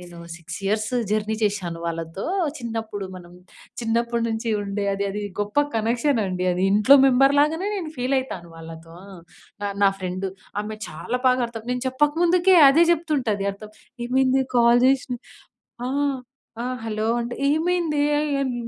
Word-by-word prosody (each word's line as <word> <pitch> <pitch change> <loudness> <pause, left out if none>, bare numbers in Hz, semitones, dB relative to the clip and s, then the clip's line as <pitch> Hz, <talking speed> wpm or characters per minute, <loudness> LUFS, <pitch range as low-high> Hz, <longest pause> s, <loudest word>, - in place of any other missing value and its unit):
నేను 175 -1 -12 0.2
6 165 -1 -8
years 215 +3 -1 0.2
journey 215 0 0
చేషాను 185 -5 -1
వాళ్ళతో. 165 +3 -4 0.3
చిన్నప్పుడు 225 -4 -5
మనం 175 -1 -13 0.5
చిన్నప్పుడు 235 +1 0
నుంచి 225 +1 -3
ఉండే 200 0 -3
అది 200 +1 -2
అది 210 +1 -4 0.2
గొప్ప 205 +8 +1
కనెక్షనండి 225 -5 0
అది. 180 +1 -2
ఇంట్లో 215 +7 +6
మెంబర్‌లాగనే 285 +8 +3
నేను 330 -5 -5
ఫీలయితాను 255 -8 -2
వాళ్ళతో. 165 0 -11 0.7
ఆ! - - 0 0.2
నా 195 - +6
ఫ్రెండు, 185 +1 -4 0.3
ఆమె 215 0 -6
చాలా 195 +11 -4
బాకర్థం 240 -3 0
నేను 250 0 -3
చెప్పక 295 +3 +1
ముందుకే 360 +2 +4
అదే 320 +5 +5
జెప్తుంటది 270 -12 -1
అర్థం. 210 +1 -12 0.3
ఏమైందే 265 +1 +2
కాల్ 235 +1 +5
జేసిన 260 -1 +1 0.7
ఆ! - - -2 0.7
ఆ! - - -3 0.2
"హలో 215 -1 -2 0.2
అంటే, 240 +1 -4 0.2
ఏమైందే 325 -1 0 0.2
ఎ - - 0 0.2
ఎన్ 260 -2 -2
230 Hz, 140 wpm, -23 LUFS, 200-265 Hz, 0.7 s, ఇంట్లో